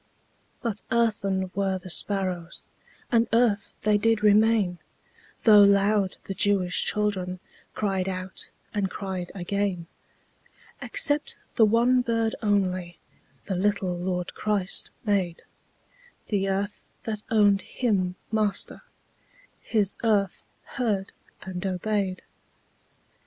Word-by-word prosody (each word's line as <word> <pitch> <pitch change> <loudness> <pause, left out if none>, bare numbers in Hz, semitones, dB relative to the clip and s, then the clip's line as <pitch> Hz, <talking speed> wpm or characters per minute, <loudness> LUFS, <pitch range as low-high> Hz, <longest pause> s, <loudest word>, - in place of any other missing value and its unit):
But 220 -4 -2
earthen 200 -5 +1
were 195 -1 0
the 185 0 -7
sparrows, 185 -3 -2 0.5
And 230 -1 +4
earth 225 -3 +2
they 210 0 +3
did 225 0 +2
remain, 210 -3 +4 0.6
Though 210 -2 +8
loud 200 0 +4
the 195 - -4
Jewish 190 -2 +1
children 190 -4 -1 0.4
Cried 195 -3 0
out, 185 0 -5 0.2
and 200 -3 0
cried 185 -2 -5
again. 195 -1 -1 1.0
Except 295 -12 0 0.2
the 220 -3 +6
one 240 +3 +4
bird 230 -2 0
only 185 -5 0 0.5
The 190 - -2
little 190 -1 0
Lord 180 0 -3
Christ 205 -3 -1 0.2
made; 190 -5 0 0.9
The 195 -2 +1
earth 200 +2 -2 0.2
that 215 -2 -3
owned 205 -3 +4
Him 190 -7 -1 0.2
Master, 215 -2 -1 0.8
His 210 -3 0
earth 205 -4 +1 0.2
heard 210 -7 -2 0.3
and 185 -1 -5
obeyed. 190 0 -1
200 Hz, 105 wpm, -26 LUFS, 185-215 Hz, 1.0 s, Though